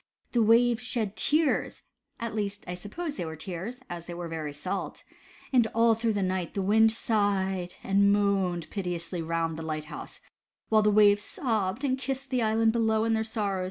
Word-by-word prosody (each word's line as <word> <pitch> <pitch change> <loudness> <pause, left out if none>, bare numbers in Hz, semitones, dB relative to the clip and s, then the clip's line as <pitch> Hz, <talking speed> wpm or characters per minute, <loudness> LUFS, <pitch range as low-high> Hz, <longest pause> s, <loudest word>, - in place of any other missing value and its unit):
The 240 - +2
waves 230 +2 +4
shed 225 -5 -2
tears 305 0 +1 0.4
(at 230 -1 -4
least, 205 -1 -3
I 180 - -3
suppose 285 - -6
they - - -3
were 160 0 -5
tears, 190 - -6
as 170 -1 -7
they 175 - -6
were 175 0 -5
very 160 -2 -4
salt) 180 +7 -4 0.5
and 240 -3 +5
all 230 0 +5
through 225 0 0
the 200 -1 0
night, 185 -2 -2
the 200 - 0
wind 220 +3 +5
sighed 195 -5 0
and 200 +1 +4
moaned 195 -5 +1
piteously 175 -3 -3
round 165 0 -2
the - - -5
light 155 -1 -4
house, - - -9 0.5
while 215 -1 +5
the 210 - +3
waves 205 -1 +5
sobbed 220 -1 -2
and 260 -2 0
kissed 270 0 -4
the 255 -1 +1
island 225 0 +3
below, 220 -1 +2
in 225 0 +1
their 220 0 +1
sorrow. 210 -4 -2
205 Hz, 190 wpm, -28 LUFS, 180-225 Hz, 0.5 s, and